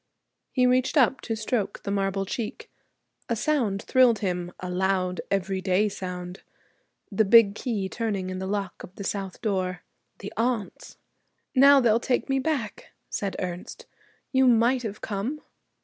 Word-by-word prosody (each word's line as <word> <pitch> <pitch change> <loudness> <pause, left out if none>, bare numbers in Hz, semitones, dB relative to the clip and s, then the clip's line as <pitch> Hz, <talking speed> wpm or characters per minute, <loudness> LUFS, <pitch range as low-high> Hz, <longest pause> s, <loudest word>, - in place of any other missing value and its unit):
He 255 -2 +2
reached 255 +4 +2
up 265 -1 +4
to 225 - -3
stroke 215 -2 -2
the 200 - -3
marble 195 -1 0
cheek. 235 - -5 0.6
A 235 - +1
sound 230 -6 0
thrilled 255 -3 +4
him, 180 -3 -2
a 180 - -5
loud 185 0 0
everyday 190 +1 +1
sound. 180 -1 -6 0.7
The 205 +2 +3
big 210 -1 +6
key 210 -4 -2
turning 200 -4 -3
in 185 - -4
the 190 - -4
lock 200 -2 -3
of 180 - -11
the 200 - -7
south 195 0 -4
door. 185 -4 -1 0.3
The 200 - -8
aunts! 230 -2 -2 0.6
'Now 280 +1 +7
they'll 230 -2 +4
take 250 +2 -1
me 270 0 +2
back,' 265 -7 -3 0.2
said 200 -2 -2
Ernest; 180 -1 -6 0.5
'you 265 -1 +4
might 240 +2 +4
have 215 -3 -6
come.' 220 +9 -3
205 Hz, 150 wpm, -26 LUFS, 190-245 Hz, 0.7 s, Now